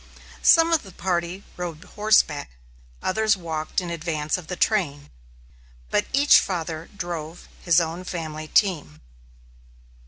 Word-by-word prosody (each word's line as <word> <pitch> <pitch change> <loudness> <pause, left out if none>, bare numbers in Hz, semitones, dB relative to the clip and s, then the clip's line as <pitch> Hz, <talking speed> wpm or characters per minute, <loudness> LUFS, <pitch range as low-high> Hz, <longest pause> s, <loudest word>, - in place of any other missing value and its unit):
Some 330 0 +6
of 325 - +3
the 195 - -13
party 175 +1 -2
rode 175 -2 -5
horseback; 205 -10 +2 0.5
others 215 +1 +2
walked 160 -2 -3
in 175 -2 -5
advance 155 -2 -2
of 180 -4 -7
the 180 - -4
train; 150 -9 0 0.8
but - - +1
each 280 +2 +6
father 165 -3 -4
drove 170 -2 -6
his 175 -1 +4
own 170 +2 -3
family 155 -3 -5
team. 155 - +1
170 Hz, 125 wpm, -24 LUFS, 155-190 Hz, 0.8 s, Some